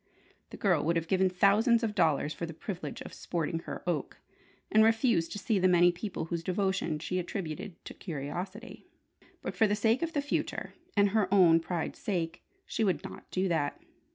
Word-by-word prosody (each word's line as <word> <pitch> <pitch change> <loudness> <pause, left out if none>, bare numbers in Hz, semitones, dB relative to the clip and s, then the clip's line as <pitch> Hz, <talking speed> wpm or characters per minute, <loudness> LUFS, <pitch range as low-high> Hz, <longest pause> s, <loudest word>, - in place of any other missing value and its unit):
The - - -9
girl 175 -7 +2
would 170 +2 +1
have 165 -1 -1
given 190 +1 +3
thousands 210 +6 +4
of 220 -2 0
dollars 155 -5 +2
for 170 - -5
the 165 - -8
privilege 200 +7 -6
of - - -10
"sporting 165 -1 -2
her - - -6
oak," 160 -6 -2 0.5
and 215 +1 +6
refusing 225 -6 +3
to - - -4
see 205 0 0
the 185 - +4
many 175 -1 +5
people 180 -1 -4
whose 165 0 -3
devotion 185 -3 0
she 180 +4 -2
attributed 180 +1 -5
to - - -7
curiosity. 180 - -6 0.6
But - - -4
for 220 - +4
the 205 - +1
sake 225 +5 +2
of 330 -1 -2
the 290 - +1
future, 285 - -2 0.2
and 200 0 +5
her 200 -2 +1
own 175 -5 +6
pride's 165 0 -3
sake, 175 -4 -2 0.2
she - - -1
would 180 -8 +1
not - - -9
do 190 +1 0
that. 150 -4 0
185 Hz, 190 wpm, -30 LUFS, 165-210 Hz, 0.6 s, and